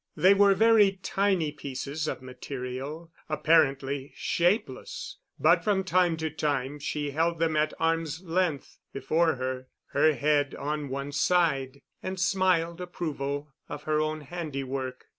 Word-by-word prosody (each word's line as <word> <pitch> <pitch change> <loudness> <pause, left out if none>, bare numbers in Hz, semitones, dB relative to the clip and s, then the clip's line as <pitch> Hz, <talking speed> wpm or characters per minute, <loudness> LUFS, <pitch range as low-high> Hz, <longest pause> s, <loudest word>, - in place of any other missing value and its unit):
They 190 +2 +6
were 200 0 +5
very 215 -1 +5
tiny 190 -6 +1
pieces 145 +1 -5
of 130 - -4
material, 130 +5 -6 0.2
apparently 140 -3 +2
shapeless, 180 - -1 0.2
but - - +4
from 200 -3 +1
time 180 -3 +2
to 160 -1 -3
time 145 -2 -2
she 145 0 -3
held 165 +3 +1
them 160 -1 +1
at 155 0 +1
arm's 165 0 0
length 170 -4 -1
before 160 +5 +1
her, 130 0 -4 0.2
her 155 +1 +4
head 145 +1 +1
on 150 0 -3
one 140 +2 -4
side, 145 -4 +1 0.2
and 185 0 -4
smiled 180 -2 +1
approval 145 -5 -4 0.2
of 145 0 -6
her 155 0 +1
own 155 0 -2
handiwork. 135 -5 -5
155 Hz, 135 wpm, -28 LUFS, 140-170 Hz, 0.2 s, They